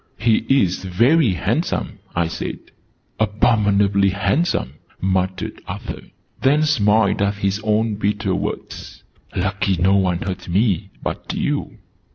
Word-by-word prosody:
"He 110 -1 +3
is 100 -11 +2
very 115 - +3
handsome," 85 - -2 0.2
I 85 -1 +1
said. 80 - -4 0.6
"Abominably 105 -2 +3
handsome!" 100 - 0 0.2
muttered 95 0 -1
Arthur: - - -6 0.4
then 145 +3 +3
smiled 110 -9 +3
at 100 0 +1
his 100 +1 -1
own 110 0 +1
bitter 105 0 0
words. - - -5 0.3
"Lucky 95 +1 0
no 95 +3 +3
one 90 -2 +1
heard 95 -2 -5
me 95 0 +1
but - - -4
you!" - - -2
100 Hz, 120 wpm, -20 LUFS, 95-110 Hz, 0.6 s, He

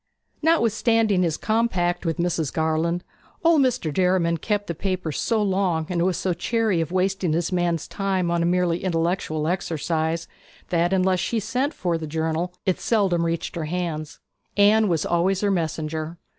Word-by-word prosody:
Notwithstanding 225 - +3
his 165 -3 0
compact 190 -6 0
with 165 - -1
Mrs. 170 -4 -1
Garland, 160 +2 0 0.4
old 330 -3 +5
Mr. 250 - 0
Derriman 180 -1 +2
kept 205 +4 -1
the 170 - -3
paper 185 -1 -2
so 220 +7 0
long, 185 -5 +1
and 175 -2 0
was 185 -1 +1
so 185 - 0
chary 220 -3 0
of 165 0 -3
wasting 185 -2 0
his 170 +3 0
man's 175 -3 0
time 190 -3 -1
on 170 0 +1
a - - +2
merely 175 -1 +1
intellectual 165 -3 -1
errand, 165 -1 -1 0.4
that 175 0 +1
unless 185 -1 +2
she 230 +5 0
sent 250 +7 -1
for 170 -3 -1
the 160 - -5
journal 160 +3 -1
it 185 - +1
seldom 195 -7 +1
reached 165 +1 -3
her 165 -2 -3
hands. 155 -2 -4 0.4
Anne 210 +2 +5
was 165 -5 0
always 180 +3 +1
her 205 -1 +2
messenger. 160 -1 -2
175 Hz, 165 wpm, -24 LUFS, 165-195 Hz, 0.4 s, old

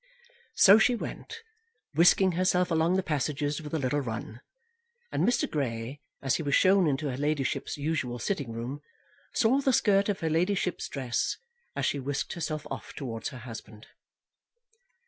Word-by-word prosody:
So 205 +1 +8
she 245 +2 +4
went, 455 - -7 0.5
whisking 175 +4 +5
herself 180 0 +1
along 165 +2 +2
the 190 - +1
passages 150 0 -1
with 150 -1 -8
a 160 - 0
little 140 0 0
run; 115 -2 -5 0.7
and - - 0
Mr. 245 - +2
Grey, 130 -1 -3 0.2
as 135 -1 +2
he - - -4
was 145 -3 +1
shown 190 -2 +5
into 145 +1 0
her 125 - -5
ladyship's 145 -2 -1
usual 145 -5 -2
sitting 140 - -2
room, 120 +5 -5 0.5
saw 255 +5 +3
the 270 - +2
skirt 200 -3 +3
of 200 - -1
her 160 - 0
ladyship's 180 +3 0
dress 130 -4 -1 0.4
as - - -1
she 145 - 0
whisked 140 +1 -3
herself 155 -3 -4
off - - -7
towards 115 -5 -4
her 130 - -9
husband. 110 -2 -10
150 Hz, 160 wpm, -28 LUFS, 130-180 Hz, 0.7 s, So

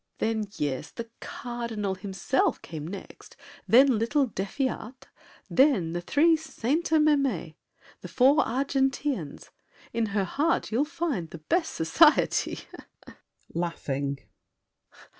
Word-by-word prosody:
] - - -46
Then, 220 -1 0
yes, 140 -3 -2
the 230 -1 -8
Cardinal 235 -5 -4
himself 195 +7 -1
came 155 -2 -7
next, 195 +2 -10 0.3
Then 255 -1 +6
little 275 +5 +2
D'Effiat, 255 +4 -4 0.4
then 255 - +3
the 175 - -2
three 320 - +4
Sainte 315 +1 -2
Mesmes, 275 - +2 0.5
The - - -9
four 265 +3 +4
Argenteans! 270 - -1 0.4
In 230 -1 0
her 200 -1 0
heart 300 - 0
you'll 250 +7 +2
find 300 - -3
The 170 - -8
best 325 - -1
society. 300 - +3 0.9
[Laughing. 140 -5 -2
235 Hz, 110 wpm, -27 LUFS, 185-280 Hz, 0.9 s, Then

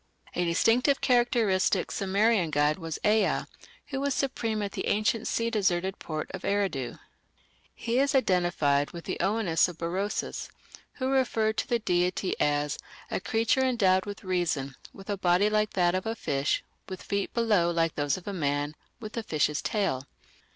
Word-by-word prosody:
A 180 - 0
distinctive 230 - +3
and - - -26
characteristic 240 -6 +2
Sumerian 200 -1 +2
god 150 +2 +2
was 165 -2 -4
Ea, 215 +1 +3 0.5
who 270 -1 -3
was 280 -1 0
supreme 225 -6 -1
at 200 - -3
the - - -4
ancient 215 +2 +1
sea 230 0 0
deserted 190 -3 0
port 155 -1 -5
of 190 - -5
Eridu. 195 -11 -1 0.8
He 235 +2 -1
is 280 +1 +2
identified 175 - +2
with 170 -1 -8
the - - -3
Oannes 190 -3 +2
of 175 - -9
Berosus, 185 +5 -3 0.4
who 260 0 -2
referred 225 -5 +1
to - - -1
the 240 - +2
deity 180 -2 0
as 145 0 0 0.3
"a - - 0
creature 225 +6 +1
endowed 200 -7 +2
with 205 +2 -7
reason, 170 -7 -1 0.2
with 195 - -13
a 205 -1 -2
body 180 +3 +3
like 215 0 +1
that 175 -2 +2
of 185 +3 -2
a 225 - -1
fish, 140 -8 -1 0.3
with 185 - -7
feet 200 -1 -2
below 210 -7 +3
like 165 -1 +1
those 145 +1 0
of 185 - -12
a 200 - -3
man, 145 -3 -1 0.3
with 215 -2 -8
a - - 0
fish's 150 -6 0
tail". 140 - -1
195 Hz, 170 wpm, -28 LUFS, 170-225 Hz, 0.8 s, distinctive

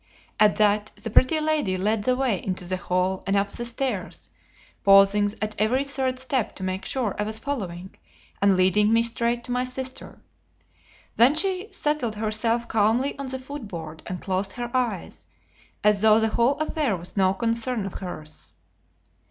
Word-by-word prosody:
At 210 -1 +5
that 210 0 +2
the 225 - -7
Pretty 260 +8 +4
Lady 305 -12 0
led 210 +2 0
the 255 - +3
way 250 -8 0
into 185 -1 -3
the 185 +1 -2
hall 185 +1 -1
and 195 - +1
up 200 0 +1
the 240 - -5
stairs, 235 -5 -4 0.5
pausing 200 +1 +5
at 215 0 -2
every 245 +6 +2
third 265 -2 -1
step 260 -3 -2
to 190 - -8
make 185 0 -3
sure 245 -7 -2
I - - +1
was 215 +1 -3
following, 190 -9 -5 0.5
and 200 -1 +4
leading 190 +3 +3
me 230 0 +4
straight 235 +1 0
to 245 - -6
my 250 +1 +1
sister. 255 +1 -5 1.0
Then 245 +6 +6
she 380 +3 0
settled 295 - -1
herself 225 +2 +1
calmly 225 +6 +1
on 275 - -4
the 260 0 -3
foot 260 -2 -8
board 160 -4 -8
and 180 0 -4
closed 190 0 -2
her 240 -1 -5
eyes, 235 -8 -2 0.6
as 210 -1 +3
though 220 0 +6
the 220 0 +1
whole 235 +5 +2
affair 300 - -1
was 175 +1 -8
no 190 -1 +3
concern 230 0 -1
of 195 - -6
hers. 155 -5 -8
220 Hz, 175 wpm, -25 LUFS, 195-255 Hz, 1.0 s, Then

